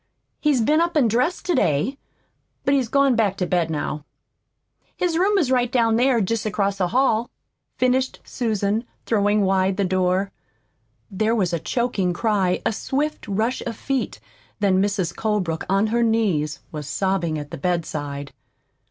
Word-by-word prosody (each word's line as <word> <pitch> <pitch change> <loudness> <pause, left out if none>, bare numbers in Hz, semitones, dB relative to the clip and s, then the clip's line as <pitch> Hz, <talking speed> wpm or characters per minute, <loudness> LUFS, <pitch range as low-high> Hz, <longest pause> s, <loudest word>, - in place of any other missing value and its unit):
He's 290 -5 +2
been 305 +8 +3
up 340 -1 +1
an' 265 -6 +4
dressed 255 - 0
to 360 - +1
day, 160 - +1 0.7
but 275 - +3
he's 265 -4 +2
gone 275 -1 +3
back 205 -4 +1
to 180 - 0
bed 175 -2 0
now. 150 -1 -3 0.9
His 350 -2 0
room 395 +4 +3
is 295 -9 +1
right 245 -2 +2
down 230 -2 +3
here, 250 -1 +3
jest 220 +2 -1
across 200 -1 -1
the 180 - +2
hall," 240 +1 +2 0.5
finished 255 +1 +1
Susan, 215 -2 -1 0.2
throwing 210 -1 +2
wide 190 0 +2
the 200 - +1
door. 185 +1 +1 0.8
There 215 +4 +1
was 185 -6 0
a 170 - 0
choking 205 -4 -1
cry, 195 -3 0
a - - +1
swift 285 +7 -2
rush 220 +5 -1
of 230 -2 -5
feet, 270 -2 -2 0.4
then 190 -2 +3
Mrs. 195 -4 -1
Colebrook, 200 -7 -1
on 195 +2 +3
her 235 +2 +1
knees, 195 -11 +1
was 150 -3 -6
sobbing 175 -1 0
at 145 -1 -7
the - - -5
bedside. 145 -4 -3
210 Hz, 160 wpm, -22 LUFS, 185-250 Hz, 0.9 s, an